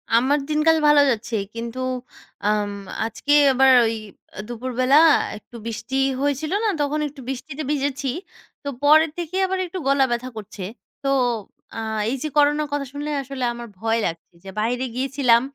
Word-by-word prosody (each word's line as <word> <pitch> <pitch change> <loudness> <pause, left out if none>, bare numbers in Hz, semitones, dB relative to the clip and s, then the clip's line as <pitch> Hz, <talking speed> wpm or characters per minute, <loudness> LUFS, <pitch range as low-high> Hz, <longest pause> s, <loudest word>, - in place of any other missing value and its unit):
আমার 265 +5 +3
দিনকাল 315 +1 +4
ভালো 295 -1 +7
যাচ্ছে। 230 0 -3 0.2
কিন্তু 235 +2 -5 0.7
আম 210 -1 +1 0.4
আজকে 230 +6 -1 0.2
আবার 265 +1 +5
ওই 225 - +1 0.5
দুপুরবেলা 255 +3 0 0.4
একটু 235 - -16
বৃষ্টি 230 +3 -5 0.3
হয়েছিল 285 +2 -1
না? - - +2
তখন 290 +1 0
একটু 280 -1 -11
বৃষ্টিতে 270 +3 -5
ভিজেছি। 280 -1 -1 0.6
তো - - -7
পরের 310 +2 +5
থেকেই 350 +3 -2
আবার 380 0 -1
একটু 365 +1 -7
গলা 275 -1 +4
ব্যথা 240 +2 -2
করছে। 205 -1 -8 0.4
তো 275 - -3 0.7
আ - - -4 0.3
এই 265 - -1
যে - - -1
করোনার 295 +1 +3
কথা 285 -1 -1
শুনলে 290 +1 -4
আসলে 270 -1 -6
আমার 235 0 -8
ভয় 225 +2 0
লাগছে 165 +1 -5
যে 195 - -9
বাইরে 245 +4 0
গিয়েছিলাম। 260 -3 +3
270 Hz, 155 wpm, -22 LUFS, 235-295 Hz, 0.7 s, ভালো